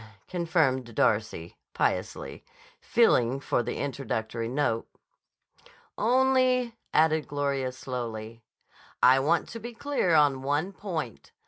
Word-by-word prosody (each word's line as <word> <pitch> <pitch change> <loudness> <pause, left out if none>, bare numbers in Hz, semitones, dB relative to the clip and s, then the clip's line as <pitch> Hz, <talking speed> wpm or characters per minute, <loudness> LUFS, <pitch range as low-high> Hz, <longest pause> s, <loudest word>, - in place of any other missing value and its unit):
confirmed 155 - 0
Darcy 105 -6 0 0.2
piously, - - -2 0.4
feeling 135 - +3
for 135 - 0
the 120 - -4
introductory 115 -5 -3
note. 125 -4 -1 1.1
"Only," 255 0 +2 0.2
added 155 0 +3
Gloria 140 -2 -1
slowly, 115 -3 -6 0.6
"I 130 +1 +7
want 160 +5 +1
to 230 - -7
be 235 +2 -7
clear 230 - +1
on 145 -3 +4
one 145 +8 -1
point. 165 - -5
140 Hz, 105 wpm, -27 LUFS, 120-180 Hz, 1.1 s, I